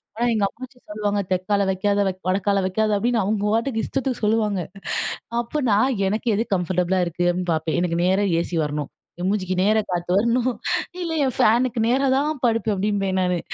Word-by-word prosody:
ஆனா 240 +2 0
எங்க 210 -2 +2
அப்பச்சி 255 +1 -11
சொல்லுவாங்க, 205 -1 -1
"தெக்கால 200 +2 +1
வைக்காத, 200 +2 0
வைக் 185 0 -4
வடக்கால 200 +1 +1
வைக்காத." 215 +3 +1
அப்படீன்னு 235 +1 +1
அவங்க 205 +1 -1
வாட்டுக்கு 230 0 0
இஷ்டத்துக்கு 265 -3 -2
சொல்லுவாங்க. 210 -3 +1 0.8
அப்ப 295 +6 -3
நா 200 - +4 0.3
எனக்கு 220 +4 -3
எது 225 +3 0
கம்ஃபர்டபுலா 180 +1 0
இருக்கு 175 +1 -2
அப்படீன்னு 175 -1 -1
பாப்பேன். 160 +1 -1
எனக்கு 170 -1 0
நேரா 190 +3 +2 0.2
ஏசி 170 -1 -3
வரணும். 150 -1 -3 0.3
என் 180 - -1
மூஞ்சிக்கு 185 -3 -1
நேர 215 +2 +3
காத்து 175 0 -2
வரணும். 235 +3 +2 0.5
"இல்ல, 335 - -3
என் 260 - -2
ஃபேனுக்கு 235 +1 +3
நேரா 270 +3 +2
தான் 295 -1 -1
படுப்பேன்" 225 -2 +1
அப்படீம்பேன் 195 -1 0
நானு. 180 -1 +1
205 Hz, 175 wpm, -23 LUFS, 185-230 Hz, 0.8 s, நா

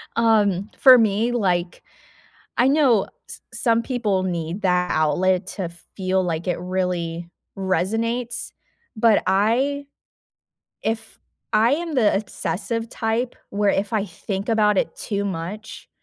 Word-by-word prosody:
Um, 210 -4 +2
for 260 -2 +8
me, 220 +1 +2
like, 180 -6 0 0.8
I 250 +2 +5
know 270 -8 +4 0.2
s - - -7
some 230 -2 +2
people 215 -8 0
need 175 +1 -3
that 180 -1 +2
outlet 180 +5 +2
to 175 -3 -2 0.3
feel 190 -1 +1
like 170 -1 -3
it 180 - -1
really 175 -2 -2 0.3
resonates, 225 +6 -1 0.4
but 220 -1 +4
I 245 +9 +1 1.0
if 225 0 -4 0.3
I 230 +4 +4
am 335 +1 -4
the 225 -5 +4
d - - +1
obsessive 220 +2 -4
type, 235 +2 -2 0.2
where 205 0 +2
if 205 - -17
I 210 -3 +1
think 195 +4 -5
about 210 -2 +3
it - - -1
too 200 -2 -2
much, 195 +4 -6
205 Hz, 130 wpm, -22 LUFS, 185-230 Hz, 1.0 s, for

